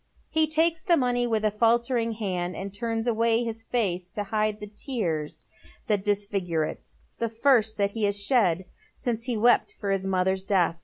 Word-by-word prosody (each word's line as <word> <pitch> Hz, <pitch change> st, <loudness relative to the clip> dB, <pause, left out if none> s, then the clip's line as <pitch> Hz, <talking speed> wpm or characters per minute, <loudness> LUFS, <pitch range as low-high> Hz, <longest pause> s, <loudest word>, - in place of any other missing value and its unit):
He 315 Hz, 0 st, +3 dB
takes 320 Hz, +1 st, +2 dB
the 350 Hz, -4 st, +3 dB
money 245 Hz, -2 st, +1 dB
with 220 Hz, -2 st, 0 dB
a 215 Hz, -, +2 dB
faltering 230 Hz, +1 st, +1 dB
hand, 185 Hz, -5 st, -3 dB
and 195 Hz, 0 st, -6 dB
turns 225 Hz, +1 st, -2 dB
away 230 Hz, 0 st, +2 dB
hip 230 Hz, -2 st, -3 dB
face 185 Hz, -7 st, -1 dB
to 205 Hz, -, -4 dB
hide 215 Hz, +1 st, -1 dB
the 210 Hz, -, -6 dB
tears 200 Hz, -, -3 dB, 0.4 s
that 205 Hz, -3 st, 0 dB
disfi/^n 200 Hz, -3 st, -1 dB, 0.2 s
e -, -, -3 dB
it, -, -, -14 dB, 0.2 s
the 230 Hz, -, 0 dB
first 225 Hz, -2 st, +2 dB
that 200 Hz, -1 st, +1 dB
he 220 Hz, 0 st, -1 dB
has 205 Hz, 0 st, +2 dB
shed 195 Hz, -6 st, +2 dB, 0.3 s
uce 230 Hz, -2 st, -2 dB
he 245 Hz, -3 st, -1 dB
wept 240 Hz, +3 st, +3 dB
for 200 Hz, -2 st, -2 dB
his 195 Hz, -1 st, -1 dB
mother's 190 Hz, 0 st, 0 dB
death. 175 Hz, -4 st, +1 dB
215 Hz, 190 wpm, -26 LUFS, 195-235 Hz, 0.4 s, He